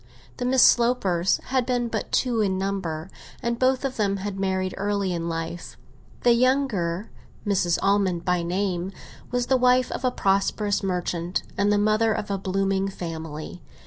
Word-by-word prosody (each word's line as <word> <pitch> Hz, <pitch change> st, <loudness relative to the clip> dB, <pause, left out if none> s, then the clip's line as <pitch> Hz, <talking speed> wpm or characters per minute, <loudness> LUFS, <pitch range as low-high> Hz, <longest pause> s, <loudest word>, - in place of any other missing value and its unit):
The 245 Hz, -, -2 dB
Miss 255 Hz, 0 st, +4 dB
Slopers 200 Hz, -8 st, +3 dB
had 260 Hz, -1 st, +2 dB
been 245 Hz, -1 st, 0 dB
but -, -, -4 dB
two 240 Hz, -4 st, +1 dB
in 190 Hz, -2 st, +1 dB
number, 190 Hz, -4 st, -3 dB, 0.3 s
and 235 Hz, 0 st, -1 dB
both 260 Hz, +1 st, +2 dB
of 265 Hz, -1 st, -3 dB
them 200 Hz, -2 st, +1 dB
had 195 Hz, 0 st, -5 dB
married 190 Hz, -1 st, -1 dB
early 200 Hz, -2 st, -1 dB
in 170 Hz, 0 st, -2 dB
life. 165 Hz, +1 st, -5 dB, 0.5 s
The 240 Hz, -, +6 dB
younger, 235 Hz, -8 st, +1 dB, 0.3 s
Mrs. 185 Hz, -4 st, +2 dB
Almond 195 Hz, -3 st, +1 dB
by 180 Hz, -1 st, +2 dB
name, 180 Hz, +1 st, -1 dB, 0.4 s
was 245 Hz, 0 st, 0 dB
the 260 Hz, +1 st, +3 dB
wife 250 Hz, 0 st, +3 dB
of -, -, -4 dB
a 255 Hz, -, +3 dB
prosperous 200 Hz, -1 st, +1 dB
merchant, 180 Hz, -2 st, -2 dB
and 200 Hz, +1 st, +2 dB
the 205 Hz, -, +3 dB
mother 215 Hz, +2 st, +3 dB
of 210 Hz, -1 st, -4 dB
a 195 Hz, -, -1 dB
blooming 195 Hz, 0 st, 0 dB
family. 160 Hz, -2 st, -6 dB
195 Hz, 165 wpm, -25 LUFS, 180-235 Hz, 0.5 s, The